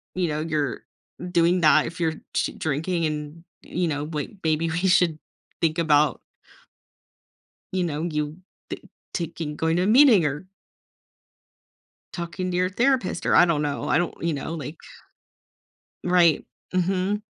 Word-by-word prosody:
”you 180 Hz, -2 st, 0 dB
know, 150 Hz, 0 st, -2 dB
you're 155 Hz, -4 st, -2 dB, 0.5 s
doing 175 Hz, +1 st, +3 dB
that, 155 Hz, -1 st, +5 dB
if 170 Hz, +2 st, -7 dB
you're 160 Hz, -2 st, +1 dB, 0.2 s
sh -, -, +1 dB
drinking 165 Hz, +3 st, -1 dB
and, 150 Hz, +1 st, -4 dB, 0.2 s
you 180 Hz, 0 st, -2 dB
know, 145 Hz, -2 st, -2 dB
wai 150 Hz, -1 st, -4 dB, 0.2 s
maybe 160 Hz, +1 st, +1 dB
we 165 Hz, -, -2 dB
should 175 Hz, -4 st, +3 dB, 0.4 s
think 160 Hz, 0 st, +1 dB
about“ 150 Hz, -4 st, +3 dB, 1.6 s
”you 185 Hz, -, +1 dB
know, 155 Hz, -2 st, -2 dB
you 150 Hz, -2 st, -2 dB, 0.3 s
ta -, -, -4 dB, 0.4 s
taking, 165 Hz, -3 st, -4 dB
going 160 Hz, +1 st, 0 dB
to -, -, +2 dB
a -, -, +1 dB
meeting 235 Hz, -, +7 dB
or“ 145 Hz, +5 st, -2 dB, 1.7 s
“talking 180 Hz, +1 st, -4 dB
to -, -, -2 dB
your 180 Hz, 0 st, +2 dB
therapist,” 240 Hz, -2 st, 0 dB
or -, -, +3 dB
I 175 Hz, -, +8 dB
don't 155 Hz, -3 st, +1 dB
know. 145 Hz, -1 st, -2 dB
I -, -, +4 dB
don't 175 Hz, 0 st, 0 dB
you 170 Hz, -1 st, 0 dB
know, 145 Hz, +3 st, -4 dB
like 155 Hz, 0 st, -6 dB, 1.3 s
Right, 175 Hz, -3 st, +4 dB, 0.3 s
mhm. 185 Hz, +3 st, 0 dB
165 Hz, 150 wpm, -24 LUFS, 150-180 Hz, 1.7 s, I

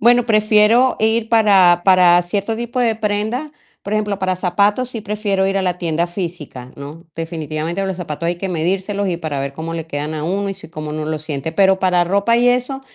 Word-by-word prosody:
Bueno, 240 Hz, +1 st, +4 dB
prefiero 215 Hz, +3 st, +4 dB
ir 220 Hz, +1 st, +1 dB
para 195 Hz, -6 st, +5 dB
para 180 Hz, -2 st, +5 dB
cierto 200 Hz, +5 st, -2 dB
tipo 240 Hz, +2 st, -4 dB
de 235 Hz, -3 st, +2 dB
prenda, 220 Hz, +7 st, -2 dB, 0.3 s
por 200 Hz, -, -3 dB
ejemplo, 210 Hz, -2 st, -1 dB
para 185 Hz, -1 st, -1 dB
zapatos, 205 Hz, +7 st, +1 dB
si 230 Hz, -, -5 dB
prefiero 205 Hz, -2 st, -1 dB
ir 195 Hz, 0 st, -1 dB
a -, -, -1 dB
la 180 Hz, -1 st, -1 dB
tienda 170 Hz, -1 st, -1 dB
física, 170 Hz, -8 st, -7 dB
¿no?, 145 Hz, +4 st, -10 dB
definitivamente 165 Hz, +2 st, -4 dB
los 190 Hz, -2 st, -3 dB
zapatos 170 Hz, -2 st, -5 dB
hay 175 Hz, -, -1 dB
que 190 Hz, +2 st, -4 dB
medírselos, 190 Hz, +4 st, -1 dB
y 175 Hz, -, -1 dB
para 155 Hz, -4 st, -4 dB
ver 140 Hz, 0 st, -4 dB
cómo 160 Hz, +2 st, -5 dB
le 165 Hz, -1 st, -5 dB
quedan 150 Hz, +1 st, -4 dB
a 155 Hz, -, -4 dB
1 195 Hz, +4 st, -1 dB
y -, -, -5 dB
si, 160 Hz, -, -12 dB
cómo 155 Hz, -2 st, -7 dB
1 155 Hz, 0 st, -4 dB
lo 155 Hz, 0 st, -3 dB
siente, 150 Hz, 0 st, -4 dB
pero 190 Hz, +1 st, +3 dB
para 180 Hz, -2 st, +2 dB
ropa 200 Hz, +6 st, +2 dB
y 245 Hz, +1 st, +3 dB
eso, 250 Hz, +2 st, 0 dB
190 Hz, 215 wpm, -18 LUFS, 165-215 Hz, 0.3 s, para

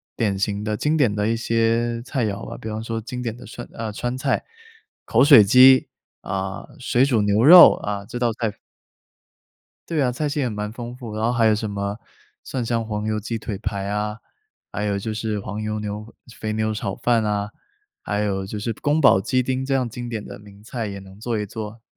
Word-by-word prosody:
典 100 Hz, -4 st, 0 dB
型 100 Hz, +1 st, -1 dB
的 105 Hz, 0 st, -2 dB
经 150 Hz, +6 st, +1 dB
典 135 Hz, -9 st, +3 dB
的 105 Hz, 0 st, 0 dB
一 115 Hz, -, +1 dB
些 115 Hz, 0 st, 0 dB
菜 125 Hz, -1 st, -1 dB
肴 100 Hz, -1 st, -5 dB
啊， -, -, -7 dB
比 110 Hz, -, -7 dB
方 110 Hz, 0 st, -4 dB
说 115 Hz, 0 st, -4 dB
经 125 Hz, +3 st, -6 dB
典 115 Hz, -3 st, -3 dB
的 125 Hz, +1 st, -12 dB
川 120 Hz, -, -9 dB
啊， 110 Hz, -1 st, -4 dB
川 120 Hz, +4 st, -3 dB
菜、 135 Hz, +1 st, -1 dB, 0.6 s
口 120 Hz, +4 st, +3 dB
水 140 Hz, -7 st, +9 dB
鸡， 130 Hz, +5 st, +7 dB, 0.3 s
啊， 95 Hz, 0 st, -4 dB
水 125 Hz, 0 st, +2 dB
煮 125 Hz, -6 st, +2 dB
牛 105 Hz, +2 st, +2 dB
肉 175 Hz, +6 st, +10 dB
啊， 100 Hz, -1 st, -4 dB
这 120 Hz, -, -6 dB
道 120 Hz, -1 st, +1 dB
菜 110 Hz, -2 st, -3 dB, 1.3 s
对 165 Hz, -3 st, 0 dB
啊， 125 Hz, -, +2 dB
菜 140 Hz, +5 st, -2 dB
系 145 Hz, 0 st, -1 dB
还 125 Hz, -, 0 dB
蛮 105 Hz, -1 st, -4 dB
丰 120 Hz, +1 st, -7 dB
富， 120 Hz, -4 st, -8 dB
然 110 Hz, -, -3 dB
后 115 Hz, -, +3 dB
还 120 Hz, -2 st, +2 dB
有 110 Hz, -, +5 dB
什 105 Hz, 0 st, -3 dB
么 100 Hz, +1 st, -3 dB, 0.4 s
蒜 125 Hz, -2 st, -4 dB
香 115 Hz, 0 st, -1 dB
黄 105 Hz, -1 st, -3 dB
油 110 Hz, 0 st, -1 dB
鸡 115 Hz, +2 st, -4 dB
腿 105 Hz, -2 st, -5 dB
排 100 Hz, -1 st, -3 dB
啊， 105 Hz, +1 st, -2 dB, 0.6 s
还 100 Hz, +1 st, -3 dB
有 100 Hz, -1 st, 0 dB
就 110 Hz, +3 st, -4 dB
是 110 Hz, -1 st, -2 dB
黄 100 Hz, +1 st, -5 dB
油 110 Hz, 0 st, -3 dB
牛 105 Hz, 0 st, -5 dB, 0.3 s
肥 110 Hz, -1 st, -2 dB
牛 110 Hz, 0 st, 0 dB
炒 100 Hz, -2 st, -3 dB
饭 120 Hz, -2 st, +2 dB
哪， 105 Hz, -1 st, -1 dB, 0.5 s
还 105 Hz, 0 st, -2 dB
有 95 Hz, -2 st, -1 dB
就 105 Hz, +2 st, -5 dB
是 115 Hz, +3 st, -2 dB
宫 145 Hz, +7 st, 0 dB
保 115 Hz, -9 st, +6 dB
鸡 130 Hz, +6 st, +1 dB
丁 130 Hz, +1 st, -2 dB
这 135 Hz, 0 st, -1 dB
样 130 Hz, -2 st, +1 dB
经 120 Hz, +1 st, -7 dB
典 110 Hz, -3 st, -4 dB
的 -, -, -9 dB
名 100 Hz, -1 st, -16 dB
菜 115 Hz, 0 st, -4 dB
也 100 Hz, -1 st, -6 dB
能 95 Hz, +1 st, -14 dB
做 115 Hz, -1 st, -2 dB
一 105 Hz, -, -2 dB
做， 110 Hz, +2 st, -7 dB
110 Hz, 240 characters per minute, -22 LUFS, 105-120 Hz, 1.3 s, 肉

